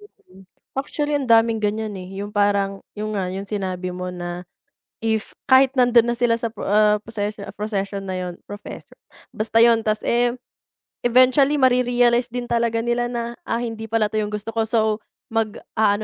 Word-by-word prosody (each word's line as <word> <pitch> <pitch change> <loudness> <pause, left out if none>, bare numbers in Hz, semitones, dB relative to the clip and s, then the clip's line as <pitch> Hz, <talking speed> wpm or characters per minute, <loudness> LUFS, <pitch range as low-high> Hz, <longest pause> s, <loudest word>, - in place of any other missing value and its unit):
Mhm. 190 - -19 0.3
Actually 290 +2 -1
ang 280 -2 -2
daming 225 -1 +4
ganyan, 210 0 -1
eh, 185 0 -8
yung 205 - -4
parang 200 -1 +1
yun 215 0 -4
nga 185 -2 -2
yung 195 +1 -6
sinabi 185 -3 -3
mo 180 0 -5
na, 175 0 -6 0.6
if 220 -1 -1
kahit 265 0 +5
nandun 245 -2 +5
na 240 - 0
sila 235 -1 +2
sa 230 - -1
pro - - -9
ah, 210 +1 +4
procesion 210 -2 -4
profession 200 -2 -3
na 185 - -3
yun, 180 -1 -4
professor 205 0 -9 0.4
Basta 225 +1 +1
yun, 230 -1 +5
ta's 215 0 0
eh, 240 0 +3 0.7
eventually 255 +4 +5
mare-realize 245 -1 +3
din 245 0 -5
talaga 235 -1 +1
nila 240 +1 0
na, 235 0 -4
ah, 230 +1 -1
hindi 225 -2 -4
pala 220 -1 +1
yung 210 0 -1
gusto 210 +2 -4
ko, 225 0 +1
so, 220 -1 +1 0.3
mag-a-ano, 215 -1 0
220 Hz, 170 wpm, -22 LUFS, 205-240 Hz, 0.7 s, kahit